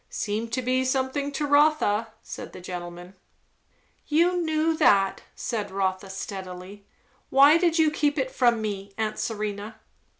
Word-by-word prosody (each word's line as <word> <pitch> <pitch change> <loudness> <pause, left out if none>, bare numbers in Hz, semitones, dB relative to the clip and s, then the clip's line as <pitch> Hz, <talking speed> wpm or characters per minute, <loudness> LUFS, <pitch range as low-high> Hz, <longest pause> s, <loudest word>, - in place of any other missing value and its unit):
"Seem 215 +2 -3
to 235 +3 -3
be 255 +1 +1
something 265 +2 -1
to 295 +1 -1
Rotha," 285 -7 +3 0.2
said - - -8
the - - -9
gentleman. 175 0 -8 0.9
"You 345 +4 +2
knew 320 0 +1
that," 195 -6 +3
said 215 -4 -3
Rotha, 190 0 -2
steadily. 190 0 -8 0.4
"Why 285 +4 +6
did 340 -2 +2
you 315 -2 +4
keep 295 -1 0
it 260 -2 -1
from 240 -3 +2
me, 200 -1 -5
aunt 215 -1 -2
Serena?" 215 0 -4
225 Hz, 140 wpm, -25 LUFS, 195-290 Hz, 0.9 s, Why